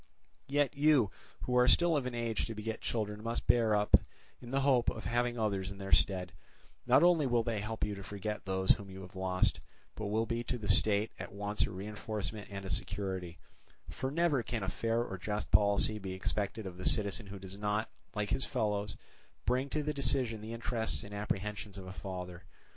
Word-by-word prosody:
Yet 145 0 +1
you 140 -8 +4 0.3
who 125 - -1
are 125 0 +6
still 170 +5 +5
of 135 -4 0
an 125 - -4
age 115 -3 -1
to 115 - -5
beget 110 +1 -4
children 105 -2 -2
must 115 +1 -2
bear 115 -3 +4
up 105 0 +6 0.4
in 120 - -9
the 135 +2 +1
hope 130 -3 +4
of 110 - -6
having 120 +1 +1
others 100 -4 0
in 100 - -8
their 95 -1 -6
stead; 90 -2 +4 0.6
not - - +6
only 170 -5 +5
will 120 -2 +3
they 115 -2 -1
help 110 +2 -3
you 105 - -3
to 100 - -7
forget 105 +2 -4
those 95 0 +2
whom 100 -1 +1
you 95 0 -8
have 95 +1 -11
lost, 95 0 +1 0.3
but 110 - -4
will 110 +2 +1
be 115 0 -2
to 125 - -1
the 105 -3 -6
state 100 +2 +3
at - - -6
once 105 +1 0
a - - -6
reinforcement 105 +2 -5
and 100 -1 -6
a - - -5
security; 90 -1 -2 0.5
for 130 - -2
never 155 -2 +2
can 115 -2 -3
a 95 - -1
fair 115 +3 0
or 95 -5 -6
just 105 +3 -3
policy 105 +1 +4
be 95 -2 -5
expected 100 +3 -2
of 90 -2 -6
the 90 - -7
citizen 100 0 +1
who 100 0 -7
does 95 0 -8
not, 105 +1 0 0.3
like 105 -2 -1
his 135 - +1
fellows, 105 -1 -1 0.5
bring 130 +4 +1
to 150 +1 -1
the 150 +1 -1
decision 130 -5 0
the 110 +1 -6
interests 115 -1 -1
and 105 - -9
apprehensions 105 0 -3
of 95 - -7
a 95 - -7
father. 90 -2 -6
105 Hz, 210 wpm, -33 LUFS, 100-120 Hz, 0.6 s, are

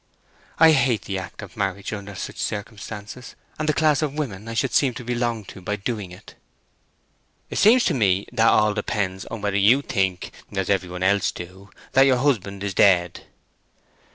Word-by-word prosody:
I 160 0 +7
hate 130 -6 +2
the 95 -1 -3
act 95 +3 -9
of 95 -2 -12
marriage 100 0 -3
under 100 -1 -7
such - - -6
circumstances, 105 +3 -6 0.2
and 155 0 -1
the - - +3
class 150 -2 +2
of 150 -2 -2
women 115 -9 -4
I 115 - -5
should 130 +1 0
seem 130 -4 +2
to 125 - -7
belong 120 -2 -2
to 95 - -11
by 105 +3 -2
doing 105 -2 -4
it!" 90 - -13 1.2
"It - - -2
seems 235 +4 +6
to - - +2
me 100 -5 +2
that 115 -1 +3
all 105 -1 +4
depends 100 -2 -2
upon 115 - -7
whe'r 100 -1 0
you 110 +8 +4
think, 95 -7 -1 0.2
as 95 0 -1
everybody 90 -2 -1
else 100 0 +2
do, 95 +3 -10 0.2
that 135 +1 +5
your 130 -2 +4
husband 105 -8 -1
is 100 -1 -2
dead." 90 -3 +3
105 Hz, 180 wpm, -23 LUFS, 95-125 Hz, 1.2 s, I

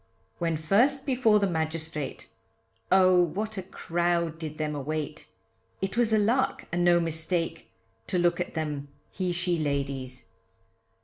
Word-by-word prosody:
When 165 -2 0
first 235 - +2
before 250 -6 +4
the 200 - +2
magistrate, 160 -3 -2 0.6
Oh, 185 -1 +6
what 210 +6 -2
a 190 - -3
crowd 170 -2 -1
did 155 -2 -6
them 155 -1 -2
await, 150 +2 -4 0.5
It 195 +1 -2
was 235 -2 +2
a 220 - +5
lark 230 +5 +1
and 175 +1 +1
no 175 0 +5
mistake, 165 +1 -1 0.4
To 185 - 0
look 175 0 +2
at 180 - -3
them 150 -3 -3 0.2
he 185 -2 -2
she 175 0 0
ladies. 140 -3 -3
170 Hz, 140 wpm, -27 LUFS, 155-190 Hz, 0.6 s, Oh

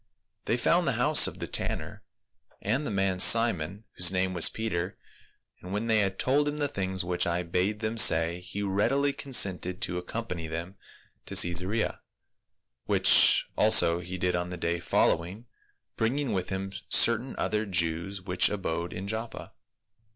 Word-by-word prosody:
"They 115 - 0
found 170 +7 +1
the 135 - +1
house 130 +5 +4
of - - -8
the - - -5
tanner, - - -4 0.6
and 130 +9 -2
the - - -3
man 95 -2 -1
Simon, 100 -3 +4
whose 90 - +3
surname 95 +1 +1
was 90 -3 +5
Peter, 95 -5 -4 0.6
and 90 - -10
when 105 +3 -3
they 110 -1 +2
had 95 -2 -1
told 145 +3 +1
him 145 0 -3
the 145 -1 -1
things 95 -7 -3
which 90 -1 0
I 85 +1 -1
bade 90 +5 -2
them 110 +1 -2
say, 85 -2 +4
he 95 +3 -6
readily 135 +9 0
consented 95 -10 0
to 90 -4 -2
accompany 90 -3 -6
them 85 +3 -6 0.5
to - - -7
Caesarea; 90 +6 0 0.8
which - - +5
also 85 +1 +3
he 90 +1 -7
did 90 0 -1
on 90 0 -3
the 90 - -7
day 85 +1 -2
following, 90 +5 -1 0.5
bringing 130 +5 -1
with 95 -2 -3
him 95 0 -5 0.2
certain 115 +3 +4
other 105 0 -2
Jews 90 +1 -3
which 90 -1 +1
abode 85 -4 -4
in 95 +2 -6
Joppa." 110 +2 -6
95 Hz, 160 wpm, -27 LUFS, 90-115 Hz, 0.8 s, was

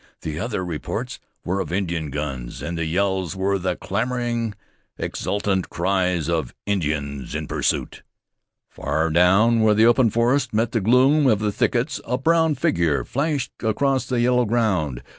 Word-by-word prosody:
The 80 0 -4
other 110 -5 -2
reports 90 +9 -4 0.3
were 95 +3 -1
of 85 -5 -3
Indian 85 -5 -2
guns, 70 -4 -5
and 85 - -3
the 85 -1 -2
yells 95 +1 0
were 95 +1 0
the 90 0 -1
clamoring, 120 +1 -2 0.4
exultant 100 -2 -2
cries 90 -3 0
of 80 -7 -2
Indians 75 -8 -2
in - - -3
pursuit. - - -1 0.7
Far 80 +2 -2
down 95 +8 +4
where 110 -1 +4
the 110 +2 +5
open 120 0 +5
forest 120 +2 +1
met 115 +1 +1
the 115 - 0
gloom 130 +7 +4
of 110 -4 +4
the 105 0 -1
thickets, - - 0
a 125 - -1
brown 160 +2 +2
figure 85 - +1
flashed 140 -2 -1
across 130 +4 0
the 125 -2 0
yellow 125 0 +3
ground. 95 - 0
100 Hz, 155 wpm, -22 LUFS, 85-120 Hz, 0.7 s, the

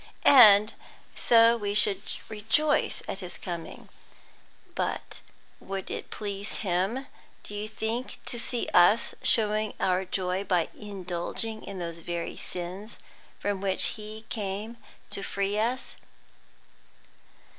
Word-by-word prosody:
"And 215 -5 +8 0.4
so 230 0 +6
we 205 -3 -2
should 200 -2 +5 0.3
rejoice 225 +8 +1
at 195 - -4
His 180 -2 -4
coming. 170 -3 -7 0.9
But - - -3 0.4
would 195 0 -6
it - - -5
please 205 +1 -4
Him, 195 +9 0 0.4
do - - -10
you 205 +1 -4
think, 220 +3 -3
to 240 - -1
see 240 0 -1
us 180 +6 +5
showing 215 -1 +2
our 185 0 +1
joy 185 +1 -1
by 180 -4 +1
indulging 200 +2 -4
in 195 - -7
those 170 -2 -5
very 170 0 -4
sins 185 +5 -6 0.4
from 200 -2 -2
which 195 -1 +1
He 215 0 -9
came 210 +2 -4 0.3
to - - -3
free 200 +1 -1
us?" 245 +4 -2
205 Hz, 120 wpm, -28 LUFS, 185-220 Hz, 0.9 s, And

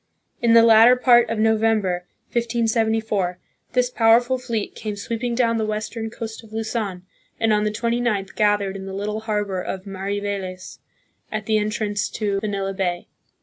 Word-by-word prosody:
In 235 -1 +4
the 230 - +8
latter 230 +2 +7
part 240 -2 +5
of 225 - -2
November, 215 -5 +1 0.2
1574, 225 -5 0 0.4
this 250 0 +2
powerful 240 +2 +3
fleet 235 -4 -3
came 210 -1 -5
sweeping 235 +3 -3
down 230 -2 +2
the 220 - 0
western 215 +1 -3
coast 225 0 -7
of 220 - -16
Luzon 220 -4 -3 0.4
and 225 -1 +2
on 210 0 +2
the - - +2
29th 230 -2 -1
gathered 205 -2 +1
in 195 0 -7
the 190 - -6
little 210 +2 -3
harbor 210 -4 -2
of 190 +1 -5
Mariveles, 195 -1 -4 0.5
at 215 -1 -3
the 215 0 +2
entrance 210 0 -1
to 200 -2 -1
Manila 200 -2 -2
Bay. 180 -2 -2
215 Hz, 155 wpm, -22 LUFS, 200-230 Hz, 0.5 s, the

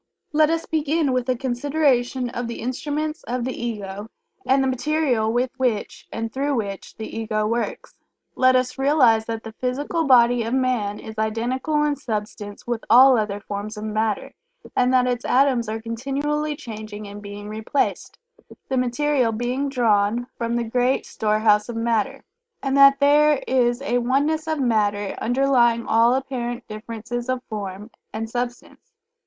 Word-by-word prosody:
Let 305 0 +4
us 330 0 -1
begin 305 -2 0
with 255 0 -1
a 255 - +3
consideration 255 -1 0
of 245 -1 -4
the 235 - -6
instruments 300 +5 -3
of 245 0 -2
the 260 +1 -2
Ego, 210 -3 -5 0.4
and 270 +1 +4
the - - +1
material 260 -4 +1
with 245 +2 0
which 245 -6 -2
and 225 0 -4
through 280 +1 0
which 200 -4 -5
the 220 - -7
Ego 215 -1 -1
works. 230 +2 -3 0.4
Let 255 0 +4
us 255 +1 0
realize 260 -6 +4
that 225 -1 -4
the 225 - -7
physical 285 +7 -2
body 245 -2 +5
of 230 +3 -1
man 245 -6 0
is 220 -1 -8
identical 250 +7 0
in 295 -1 +1
substance 210 -4 -5
with 240 -2 -3
all 255 +3 +8
other 210 -3 -1
forms 205 +2 -6
of 210 - -6
matter, 215 -1 -2 0.4
and 250 0 +3
that 255 -1 +4
its 245 -1 -1
atoms 255 -4 +2
are 220 +1 -3
continually 280 +6 -2
changing 215 -4 -8
and 205 +1 -9
being 205 0 -8
replaced, 220 +6 -2 0.5
the 265 - 0
material 255 0 +1
being 245 +5 -2
drawn 230 -2 +2
from 235 0 -2
the 240 - 0
great 245 +3 0
storehouse 215 0 +2
of 235 - -4
matter, 235 +4 -1 0.4
and 270 -1 0
that 275 0 +7
there 295 0 +4
is 245 0 +1
a 245 -3 +1
Oneness 285 +6 0
of 315 -1 -1
matter 205 -5 +1
underlying 240 -2 +2
all 230 +2 +4
apparent 245 -2 -4
differences 230 +3 -6
of 255 -1 -1
form 205 -1 -6 0.2
and 225 +1 -4
substance. 245 - -5
245 Hz, 160 wpm, -23 LUFS, 220-270 Hz, 0.5 s, all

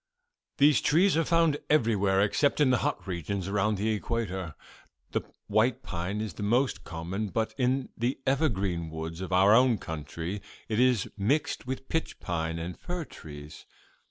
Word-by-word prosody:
"These 145 -1 +5
trees 180 +5 +4
are 165 - +3
found 165 -3 +3
everywhere 105 -9 +3
except 140 +9 +2
in 140 -3 +5
the 125 - +3
hot - - -2
regions 95 +1 -3
around 105 +1 +1
the 105 +3 0
equator. 100 -6 -3 0.6
The - - 0 0.2
white 110 +3 +2
pine 90 +5 -3
is 110 - -4
the - - -8
most 120 +6 +1
common, 90 +6 -4
but 110 +3 -1
in 130 0 0
the 120 +3 -1
evergreen 100 - 0
woods 80 +2 -6
of 95 - -5
our 95 +3 +6
own 125 -1 +5
country 80 +4 -5 0.3
it 110 0 -1
is 125 -5 +3
mixed 125 +5 0
with 130 +1 -4
pitch 160 - -2
pine 80 -2 -2
and 85 +2 -5
fir 175 -2 -4
trees. 75 - -11
105 Hz, 160 wpm, -28 LUFS, 90-130 Hz, 0.6 s, our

